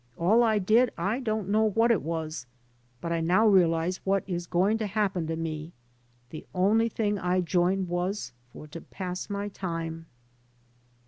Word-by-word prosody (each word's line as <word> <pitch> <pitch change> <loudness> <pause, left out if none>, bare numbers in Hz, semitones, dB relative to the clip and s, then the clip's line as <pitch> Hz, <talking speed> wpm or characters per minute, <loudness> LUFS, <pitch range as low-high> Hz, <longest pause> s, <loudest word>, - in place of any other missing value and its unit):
All 205 +8 +4
I 220 -2 +3
did 220 +5 +3
I 200 +8 -1
don't 215 -6 -2
know 215 +2 +3
what 225 +3 +3
it 215 - +2
was, 155 -5 -4 0.5
but 170 - -4
I 165 - 0
now 180 +7 +3
realize 175 -2 +3
what 195 0 +1
is 175 -2 -4
going 195 +6 +1
to 215 - -1
happen 195 -5 -1
to 165 - -2
me. 160 0 -5 0.6
The 155 - -8
only 215 +5 +3
thing 210 -2 -1
I 180 +1 +1
joined 180 +2 +1
for 175 - -6 0.2
was 210 - -6 0.4
to 165 - -8
pass 180 0 -6
my 200 0 -3
time." 165 -4 -5
185 Hz, 170 wpm, -27 LUFS, 170-210 Hz, 0.6 s, All